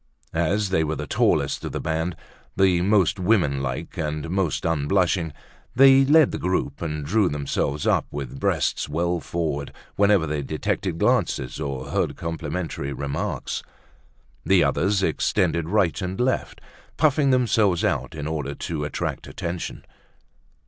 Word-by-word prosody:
As 90 +5 +1
they 80 -4 +2
were 80 0 -1
the - - -4
tallest - - +1
of - - -5
the - - -2
band, 80 +2 -2 0.4
the 95 -2 +3
most 100 0 +3
woman 90 -9 +2
like 65 -2 -4
and 75 +1 -3
most 95 -5 0
unblushing, 80 +2 +1 0.4
they 135 +1 +7
led 155 +1 +5
the - - -4
troop 90 -6 -1
and 75 -3 -3
drew 95 +4 +2
themselves 70 0 -2
up - - +2
with 70 -2 -6
breasts - - 0
well 85 +3 0
forward 75 -2 -3 0.3
whenever 100 -4 +4
they 75 -1 -2
detected 80 +4 -2
glances 65 -5 0
or 70 -3 -4
heard - - 0
complimentary 80 -3 -4
remarks. 70 +1 -3 0.8
The - - +4
others 95 +1 +1
extended 85 -3 +1
right 95 -4 +1
and 90 +1 -4
left, 130 +1 -1 0.4
puffing 150 -2 +3
themselves 110 -8 +2
out - - -1
in 75 -2 -5
order 75 -3 -3
to 75 0 -4
attract 75 - -4
attention. 90 -2 -5
85 Hz, 140 wpm, -24 LUFS, 75-95 Hz, 0.8 s, they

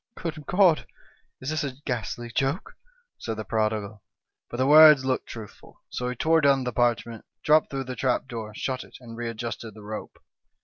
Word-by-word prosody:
" - - -67
' - - -52
Good 155 -4 -5
God! 180 -4 +4 0.5
is 130 +3 -3
this 155 +1 -1
a 140 -2 -3
ghastly 120 -1 -3
joke 135 - -1 0.2
?' 485 0 -41
said 115 -2 -4
the 110 - -5
prodi 110 0 +1
gal. 100 0 -10 0.5
But 120 - -6
the 130 - +2
words 150 -1 +8
looked 130 -1 -1
truthful; 110 -3 -11
so 125 0 -2
he 125 - -4
tore 160 +5 +3
down 140 -2 +4
the 125 -1 -3
parchment, 115 -1 0 0.2
dropped 155 +1 +4
through 135 -1 -3
the 130 -1 -6
trap 130 0 0
door, 110 -3 -6
shut 130 +2 -3
it, - - -14
and 115 -2 -10
readjusted 115 -1 -5
the 105 - -12
rope. 105 +1 -7
125 Hz, 205 wpm, -26 LUFS, 115-145 Hz, 0.5 s, words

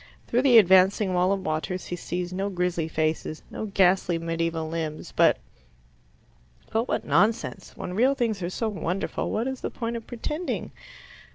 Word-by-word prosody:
Through 245 - +1
the 260 -3 +6
advancing 190 0 +5
wall 180 +1 +3
of 195 -1 -1
waters 170 +3 -2
he 175 - -4
sees 175 +1 -4
no 195 +2 -1
grisly 180 -3 -1
faces, 155 0 -2
no 220 - -4
ghastly 185 -3 +3
medieval 165 -1 -2
limbs, 155 -1 -4
but - - +4 1.3
But 225 +3 0
what - - -1
nonsense! 195 +4 0
When 180 - -5
real 255 +8 +3
things 230 -7 -1
are 175 - -2
so 225 +5 -2
wonderful, 190 -3 -2
what 230 +4 -1
is 265 -1 -4
the - - -2
point 230 -1 -4
of 230 -1 -7
pretending? 300 +8 -4
185 Hz, 165 wpm, -26 LUFS, 170-225 Hz, 1.3 s, the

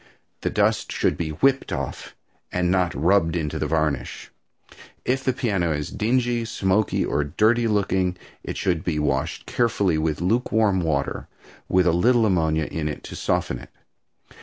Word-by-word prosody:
The - - 0
dust - - +1
should - - +1
be 85 -2 -3
whipped 130 - +1
off, - - -5 0.4
and 90 -1 +1
not 90 -5 +1
rubbed 85 +3 +2
into 75 -4 -2
the 75 - -1
varnish. 75 -3 -2 0.7
If 130 +1 0
the 130 - +2
piano 100 -10 0
is 75 0 -4
dingy, 120 +1 0
smoky 100 -2 +1
or 75 - 0
dirty 110 +10 +2
looking, 95 -4 +1 0.3
it - - -5
should 90 -5 0
be 80 -3 -1
washed 70 -3 -1
carefully 100 -8 +1
with 80 -1 -1
lukewarm 110 0 +2
water 75 -4 -1 0.4
with 90 -1 +3
a 85 - +4
little 115 +6 +4
ammonia 80 -5 +1
in 80 0 -3
it 75 - -5
to - - -8
soften - - -1
it. - - -13
90 Hz, 160 wpm, -23 LUFS, 80-110 Hz, 0.7 s, a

